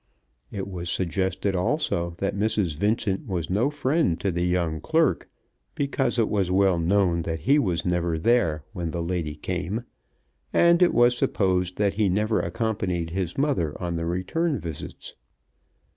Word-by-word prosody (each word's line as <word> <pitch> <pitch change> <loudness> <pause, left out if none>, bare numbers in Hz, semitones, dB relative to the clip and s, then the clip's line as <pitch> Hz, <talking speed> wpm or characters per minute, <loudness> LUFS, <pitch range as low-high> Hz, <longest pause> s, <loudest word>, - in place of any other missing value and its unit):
It 100 -2 -5
was 90 -3 -5
suggested 95 +2 -1
also 90 - 0
that 100 0 -2
Mrs. 100 -5 0
Vincent 100 +2 0
was 90 -4 -3
no 110 +9 +2
friend 145 - 0
to 100 - 0
the 85 0 -1
young 85 -3 0
clerk, 160 - +1 0.5
because 140 -3 0
it 115 -2 +3
was 100 -4 0
well 95 -1 +3
known 90 0 +2
that 80 -1 -4
he 140 +3 +4
was 90 - -1
never 85 -2 0
there 80 - +2
when 85 -4 -3
the 85 +1 -3
lady 85 -3 -2
came, 90 +8 -3 0.7
and 170 +1 +4
it 180 - +4
was 120 +1 +5
supposed 90 -5 0
that 100 -1 +1
he 105 -1 +1
never 105 +4 +1
accompanied 95 -7 -2
his 90 -1 -3
mother 135 - 0
on 85 -2 -3
the 85 0 -2
return 135 - -1
visits. 80 -4 -7
95 Hz, 160 wpm, -25 LUFS, 85-110 Hz, 0.7 s, was